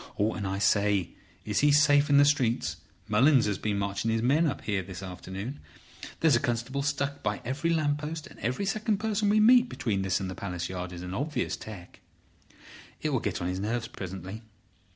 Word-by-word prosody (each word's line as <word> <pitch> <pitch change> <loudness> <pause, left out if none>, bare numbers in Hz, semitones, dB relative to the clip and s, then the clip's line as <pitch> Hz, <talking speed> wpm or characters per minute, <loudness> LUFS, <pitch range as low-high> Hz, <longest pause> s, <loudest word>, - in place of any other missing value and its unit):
And, 105 -1 0
I 95 +1 -2
say, 100 -2 +2 0.3
is 105 -1 0
he 145 0 +4
safe 145 0 +5
in 140 - +5
the 145 - +7
streets? 120 - +1 0.3
Mullins 130 +5 +4
has 105 -2 -1
been 105 -2 -1
marching 100 +2 -1
his 115 0 0
men 150 +7 +3
up 140 - -3
here 100 -3 -1
this 95 0 -8
afternoon. 95 +7 -6 0.6
There's 160 -5 +5
a - - +3
constable 120 +2 -2
stuck 140 0 -2
by - - -1
every 140 +7 -1
lamp 150 -3 +1
post, 155 +1 -5
and - - -14
every 125 - -1
second 215 +1 0
person 215 -1 0
we 215 +1 +4
meet 245 +3 +6
between 100 -5 -2
this 95 -1 0
and 95 -1 -4
Palace 90 -3 -4
Yard 90 -1 -5
is 90 0 -7
an 90 0 -6
obvious 140 +4 -2
'tec.' 100 -5 -10 1.0
It - - +1
will - - +1
get - - -3
on - - -1
his 90 +1 -2
nerves 115 +3 -2
presently. 95 +3 -7
115 Hz, 195 wpm, -28 LUFS, 95-145 Hz, 1.0 s, the